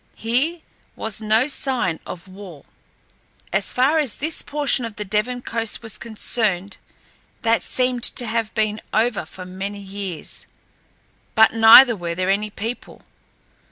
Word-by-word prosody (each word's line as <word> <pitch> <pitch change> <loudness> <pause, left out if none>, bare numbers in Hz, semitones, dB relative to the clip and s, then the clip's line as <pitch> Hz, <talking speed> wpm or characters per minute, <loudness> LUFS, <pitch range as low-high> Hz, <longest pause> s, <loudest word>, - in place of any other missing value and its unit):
Here 275 +10 -1 0.3
was 220 -1 -3
no 220 +4 +2
sign 255 - -1
of 180 +1 -8
war. 185 -6 -12 0.9
As 195 +1 +2
far 275 +6 +2
as 280 -7 0
this 315 +2 -1
portion 285 -3 0
of 230 -2 -6
the 210 -2 -5
Devon 215 +5 -1
coast 230 0 -2
was 220 -2 -3
concerned, 210 -4 -1 0.7
that 230 0 +2
seemed 250 -2 0
to 245 - 0
have 225 -1 -2
been 215 0 -1
over 225 0 +1
for 185 - -10
many 190 +2 -6
years, 195 -4 -7 0.9
but 220 -1 +6
neither 225 +2 +8
were 170 -3 -4
there 185 +2 0
any 210 +2 0
people. 225 +4 -7
220 Hz, 140 wpm, -21 LUFS, 200-245 Hz, 0.9 s, neither